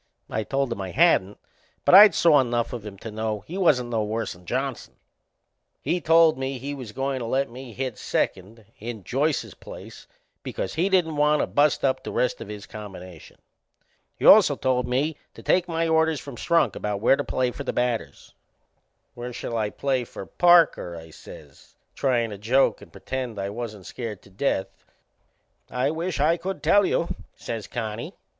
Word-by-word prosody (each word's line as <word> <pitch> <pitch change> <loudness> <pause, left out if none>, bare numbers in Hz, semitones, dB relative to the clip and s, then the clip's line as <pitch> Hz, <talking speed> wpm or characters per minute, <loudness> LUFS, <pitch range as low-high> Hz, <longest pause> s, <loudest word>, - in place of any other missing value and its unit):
I 110 - -1
told 135 +3 -1
him 100 - -7
I 95 - -4
hadn't, 105 - +3 0.5
but - - +4
I'd 205 +2 +10
saw 155 -4 +5
enough 120 -2 0
of 120 -4 -5
him 105 -2 -9
to 110 +3 -8
know 110 -1 -3
he 165 - -9
wasn't 140 -11 +2
no 110 -2 0
worse'n 105 -4 -4
Johnson. 130 +2 -3 0.8
He 170 +5 -1
told 165 -2 +5
me 135 0 -3
he 140 +3 -5
was 130 -6 -8
goin' 135 +3 -2
to 120 - -4
let 135 +1 0
me 125 0 -9
hit 130 0 -4
second 105 +4 -2
in 110 -2 -7
Joyce's 145 - -1
place - - -12 0.3
because 95 - -4
he 175 +5 +1
didn't 170 -5 +1
want 150 0 +3
to - - +1
bust 145 -1 +2
up 130 -1 0
the - - -5
rest 125 - 0
of - - -7
his 105 -1 -8
combination. 95 -6 -11 0.8
He - - -3
also - - +8
told 125 -1 0
me 140 +5 0 0.2
to - - -12
take 180 0 +2
my 165 -1 -1
orders 160 -2 +2
from 140 -3 -9
Strunk 170 +7 +1
about 105 -1 -3
where 120 +5 +4
to - - -3
play 125 -1 -1
for - - -7
the - - -2
batters. 125 -2 -3 0.8
"Where 120 0 -7
shall 120 0 -5
I 110 -2 0
play 130 +2 -1
for 105 - -9
Parker?" 170 - +4
I 80 0 -11
says, - - -14 0.2
tryin' 120 -4 0
to 100 - -8
joke 125 +6 +2
and - - -14
pretend 130 -4 -5
I 100 +1 -3
wasn't 105 -4 -7
scared 110 -6 -6
to 100 - -18
death. 95 -1 -2 0.9
"I 125 +3 0
wisht 165 +1 -3
I 160 +4 +3
could 190 +3 -5
tell 205 -1 +4
you," 170 - 0 0.3
says 115 -3 -6
Connie. 110 -1 -5
125 Hz, 185 wpm, -25 LUFS, 110-150 Hz, 0.9 s, I'd